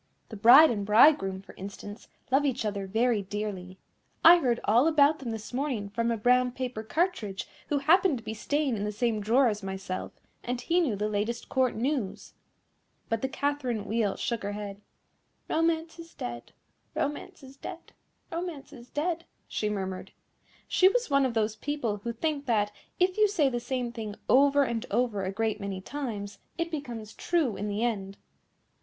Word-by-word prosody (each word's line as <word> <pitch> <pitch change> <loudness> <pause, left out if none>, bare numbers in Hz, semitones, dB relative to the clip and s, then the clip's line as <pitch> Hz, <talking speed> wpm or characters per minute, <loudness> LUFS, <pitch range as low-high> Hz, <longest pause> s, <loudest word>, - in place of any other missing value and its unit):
The 220 - -7
bride 245 +9 +8
and 205 -3 -2
bridegroom, 210 -3 +5
for - - -14
instance, 205 +2 -9 0.2
love 270 +2 +4
each 260 -5 0
other 200 -2 -2
very 225 +2 +2
dearly. 195 -2 -5 0.5
I 345 +2 +10
heard 240 -6 +1
all 240 +8 +4
about 305 -1 +4
them 260 -4 -5
this 225 +1 -6
morning 250 -7 -2
from 230 +3 -1
a 230 - 0
brown 250 +2 +3
paper 250 -3 -4
cartridge, 220 - -1 0.2
who 290 - +1
happened 320 +2 +4
to 230 - -10
be 220 0 -4
staying 285 +4 0
in 205 - -3
the 210 - -1
same 215 0 0
drawer 245 +6 +4
as 210 -2 -1
myself, 190 -1 -5 0.3
and 245 0 -2
he 335 +8 +1
knew 290 -12 +1
the 210 +1 -1
latest 215 +3 -2
Court 260 -2 +1
news." 245 -4 -2 0.8
But 225 -1 0
the 265 - -1
Catherine 265 -7 -2
Wheel 215 -2 0
shook 235 -2 -2
her 205 +1 -3
head. 205 -1 -6 0.7
"Romance 325 0 0
is 330 0 -11
dead, 120 0 -6 0.4
Romance 290 -1 -3
is 265 0 -12
dead, 345 +4 -9 0.4
Romance 330 -4 -5
is 245 -3 -13
dead," 335 +2 -2 0.2
she 210 - -2
murmured. 190 -2 -4 0.5
She 370 - +5
was - - -1
one 275 -1 +4
of 235 - -5
those 220 0 0
people 270 -8 -2
who 235 +4 -4
think 285 +4 -2
that, 210 -3 +2 0.3
if 365 +1 +2
you 425 - +6
say 335 -9 +2
the 240 -2 -2
same 245 0 -3
thing 220 -3 -6
over 280 +2 +5
and 235 -3 -2
over 220 -3 0
a 190 - -2
great 215 +1 -1
many 195 -1 -4
times, 205 -4 -5 0.2
it 335 0 -2
becomes 240 -8 -6
true 315 - 0
in 205 - -4
the 205 +2 -1
end. 200 -5 -2
235 Hz, 180 wpm, -28 LUFS, 210-285 Hz, 0.8 s, I